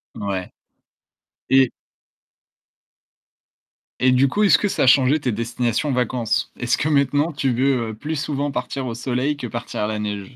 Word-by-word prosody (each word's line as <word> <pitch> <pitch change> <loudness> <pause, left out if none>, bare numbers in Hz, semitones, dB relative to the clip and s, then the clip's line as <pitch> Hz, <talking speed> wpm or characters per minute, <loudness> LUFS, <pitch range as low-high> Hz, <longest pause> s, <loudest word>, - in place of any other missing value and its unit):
Ouais. 100 -3 -4 1.0
Et 130 -2 +5 2.3
et 130 0 +4
du 130 +2 +4
coup, 210 +10 0
est-ce 200 - +6
que 205 - 0
ça - - 0
a - - +3
changé 135 +3 +5
tes 125 - 0
destinations 120 +5 -1
vacances? 115 -2 -1
Est-ce 125 0 +1
que 155 - -1
maintenant 145 +2 +2
tu 135 -3 -1
veux 125 -3 0
plus 150 +6 -4
souvent 145 0 -2
partir 130 +1 -4
au 115 - -3
soleil 130 +4 -2
que 125 - -5
partir 120 -1 -5
à 105 - 0
la 110 -1 -3
neige? 105 +2 -5
125 Hz, 160 wpm, -21 LUFS, 115-140 Hz, 2.3 s, est-ce